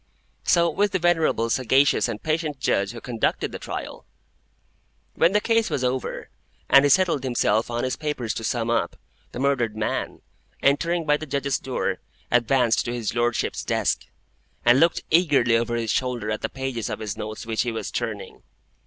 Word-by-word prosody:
So 170 -1 +4
with 200 +4 0
the - - +3
venerable, 165 -10 +1
sagacious, 130 +3 +3
and 110 -3 -6
patient 155 -3 -1
Judge 100 -6 +1
who 120 - -7
conducted 115 -1 -1
the - - -7
trial. - - -6 1.1
When 170 - +3
the 210 - +4
case 225 +1 +1
was 130 - -2
over, 125 +1 -2 0.4
and 140 0 +7
he - - +4
settled 165 -2 +3
himself 115 -4 +1
and 120 0 -2
his 130 - -2
papers 150 -7 -3
to 115 - -5
sum 115 0 -1
up, 115 -7 0 0.4
the - - -8
murdered 125 -5 0
man, 110 - -3 0.4
entering 165 +4 +2
by 150 -1 +3
the 155 - -8
Judges' 140 0 -1
door, 130 - -2 0.3
advanced 120 -1 +3
to 120 - -3
his 115 -3 -3
Lordship's 120 0 -1
desk, - - -1 0.6
and 120 +2 +6
looked 165 +2 +3
eagerly 145 -9 +4
over 120 +1 0
his 115 -2 -1
shoulder 120 -4 -1
at 110 - -3
the - - -2
pages 130 -4 -4
of - - -3
his 105 -2 -5
notes 110 0 -6
which 110 -1 -1
he 120 - -1
was 110 -2 -5
turning. 105 -5 -5
125 Hz, 180 wpm, -24 LUFS, 115-150 Hz, 1.1 s, and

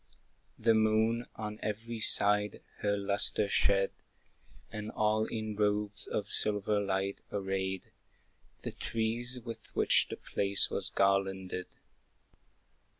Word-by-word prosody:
The 115 0 +4
moon 110 +2 +2
on 105 0 -5
every 110 +2 -4
side 105 -1 +4 0.2
her 100 0 +1
lustre 100 +1 +2
shed, 100 0 +2 0.8
And 105 0 -5
all 110 0 +1
in 110 -2 -4
robes 105 0 0
of - - -2
silver 105 0 +1
light 95 0 -1
arrayed 95 -1 -2 0.7
The - - -4
trees 120 +3 -2
with 115 -1 -8
which - - +3
the - - -5
place 100 -1 0
was - - -2
garlanded. 95 -2 +1
105 Hz, 110 wpm, -32 LUFS, 100-110 Hz, 0.8 s, The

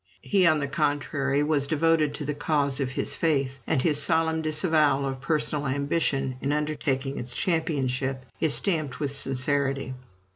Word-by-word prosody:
He, 190 -4 +3
on 155 -2 +4
the 140 -1 -2
contrary, 140 0 0
was 150 -2 +1
devoted 155 -1 +1
to 145 - -5
the 150 - -2
cause 145 -2 0
of 135 -2 -1
his 130 - -1
faith, 135 -5 0
and 135 -5 +1
his 150 -3 +2
solemn 160 +1 +1
disavowal 155 -3 +2
of 135 -1 -4
personal 150 -1 -1
ambition 140 -1 -1
in 140 - -1
undertaking 145 -2 -2
its 120 +1 -4
championship 135 -6 -1
is 160 -3 +2
stamped 155 -9 -1
with 145 -2 -1
sincerity. 135 0 +1
145 Hz, 155 wpm, -26 LUFS, 135-155 Hz, -, on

